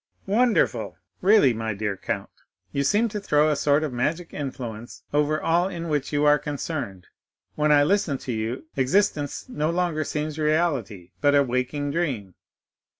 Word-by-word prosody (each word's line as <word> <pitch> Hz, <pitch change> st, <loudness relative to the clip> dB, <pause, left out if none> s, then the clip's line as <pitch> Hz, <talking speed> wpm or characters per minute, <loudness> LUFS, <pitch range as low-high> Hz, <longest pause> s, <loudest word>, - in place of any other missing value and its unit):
"Wonderful! 230 Hz, +4 st, +1 dB, 0.2 s
Really, 195 Hz, -, +5 dB
my 110 Hz, -1 st, -3 dB
dear 105 Hz, -1 st, -2 dB
count, -, -, -4 dB, 0.4 s
you 140 Hz, -, 0 dB
seem 210 Hz, +9 st, +3 dB
to 210 Hz, -, -4 dB
throw 155 Hz, -6 st, +3 dB
a -, -, +1 dB
sort 145 Hz, +1 st, +2 dB
of 150 Hz, -5 st, -3 dB
magic 160 Hz, +8 st, -2 dB
influence 120 Hz, -5 st, -6 dB
over 150 Hz, +1 st, +2 dB
all 175 Hz, +2 st, +2 dB
in 170 Hz, -3 st, -5 dB
which 145 Hz, -2 st, -1 dB
you 145 Hz, 0 st, +1 dB
are 150 Hz, 0 st, +5 dB
concerned; 140 Hz, -, -5 dB, 0.5 s
when 150 Hz, 0 st, +1 dB
I 145 Hz, -1 st, +6 dB
listen 170 Hz, -4 st, +1 dB
to 125 Hz, -, -6 dB
you, 115 Hz, +6 st, -3 dB
existence 145 Hz, -, 0 dB
no 155 Hz, -11 st, -1 dB
longer 170 Hz, -2 st, 0 dB
seems 155 Hz, +1 st, -3 dB
reality, 145 Hz, -, 0 dB
but 145 Hz, 0 st, +4 dB
a 140 Hz, -, +5 dB
waking 130 Hz, +3 st, -2 dB
dream. 135 Hz, -, -2 dB
150 Hz, 160 wpm, -25 LUFS, 130-165 Hz, 0.5 s, I